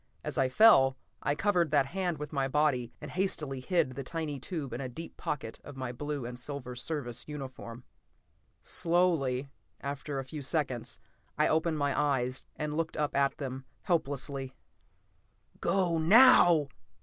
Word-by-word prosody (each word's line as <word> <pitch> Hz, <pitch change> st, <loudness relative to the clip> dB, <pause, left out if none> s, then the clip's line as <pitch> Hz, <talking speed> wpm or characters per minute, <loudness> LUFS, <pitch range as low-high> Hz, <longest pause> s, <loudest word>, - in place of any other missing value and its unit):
As -, -, -4 dB
I 130 Hz, -1 st, +2 dB
fell, 135 Hz, -6 st, +6 dB, 0.2 s
I 145 Hz, -, 0 dB
covered 180 Hz, -3 st, +2 dB
that 145 Hz, -2 st, +3 dB
hand 175 Hz, +2 st, -2 dB
with 150 Hz, +1 st, -7 dB
my 135 Hz, -2 st, +1 dB
body 135 Hz, -4 st, +1 dB
and -, -, -8 dB
hastily 155 Hz, -8 st, -1 dB
hid 165 Hz, 0 st, +1 dB
the 135 Hz, +2 st, -6 dB
tiny 155 Hz, -1 st, -4 dB
tube 140 Hz, -4 st, -5 dB
in 125 Hz, -, -4 dB
a 130 Hz, -, -4 dB
deep 165 Hz, +7 st, -9 dB
pocket 120 Hz, -6 st, -4 dB
of 145 Hz, -2 st, -10 dB
my 130 Hz, -2 st, -3 dB
blue 145 Hz, +1 st, -4 dB
and 120 Hz, +1 st, -6 dB
silver 125 Hz, -1 st, -5 dB
Service 120 Hz, -2 st, -4 dB
uniform. 130 Hz, -5 st, -7 dB, 0.8 s
Slowly, 155 Hz, -7 st, +1 dB, 0.3 s
after 140 Hz, +1 st, -4 dB
a 135 Hz, -, -2 dB
few 145 Hz, +3 st, -7 dB
seconds, 135 Hz, -, -1 dB, 0.4 s
I 150 Hz, -, +4 dB
opened 160 Hz, 0 st, +1 dB
my 145 Hz, -1 st, 0 dB
eyes 130 Hz, -3 st, 0 dB
and 150 Hz, -1 st, -3 dB
looked 165 Hz, 0 st, -2 dB
up 150 Hz, -1 st, -1 dB
at 140 Hz, 0 st, +2 dB
them, 135 Hz, -1 st, -5 dB, 0.2 s
helplessly. 140 Hz, -6 st, -1 dB, 1.0 s
"Go, 175 Hz, -4 st, +1 dB
now!" 175 Hz, -, +7 dB
145 Hz, 155 wpm, -30 LUFS, 130-160 Hz, 1.0 s, now